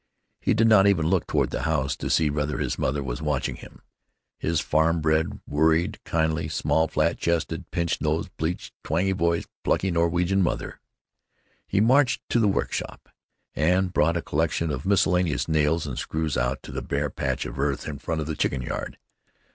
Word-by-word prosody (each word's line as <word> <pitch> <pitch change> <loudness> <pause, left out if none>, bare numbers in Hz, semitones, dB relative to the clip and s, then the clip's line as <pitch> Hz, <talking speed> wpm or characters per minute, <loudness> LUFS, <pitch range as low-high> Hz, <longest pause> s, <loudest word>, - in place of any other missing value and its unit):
He - - +1
did 115 +1 +4
not 105 -3 +6
even 90 -6 +3
look 90 +1 +1
toward - - +1
the - - -2
house 70 -4 0
to - - -4
see 80 -2 +3
whether 75 -1 -1
his - - -2
mother 70 +2 0
was 65 +3 -4
watching 75 -4 -1
him—his 85 -1 -7
farm 80 +2 +2
bred, 80 0 0
worried, 80 +3 +1
kindly, 80 0 0
small, 80 0 +1
flat - - 0
chested, 85 -1 -1
pinch 85 -1 -1
nosed, 80 +1 -1
bleached, 80 +3 -3
twangy 90 +5 0
voiced, 85 -3 0 0.2
plucky 95 - +1
Norwegian 85 +3 +2
mother. 85 - -2 0.9
He - - +1
marched 125 +2 +3
to 120 - +2
the 110 - +3
workshop 100 - -2 0.5
and 90 +4 +2
brought 85 +1 +2
a 85 - -3
collection 80 +1 0
of 85 - -4
miscellaneous 90 -4 +2
nails 80 +1 +1
and 70 -4 -4
screws 80 -1 -2
out 65 +2 -1
to - - -9
a - - -2
bare - - -2
patch - - -2
of - - -7
earth 70 -1 -1
in 70 -3 -5
front 80 +1 -2
of - - -3
the 80 0 -3
chicken 65 -3 -1
yard. - - -5
80 Hz, 180 wpm, -25 LUFS, 75-90 Hz, 0.9 s, not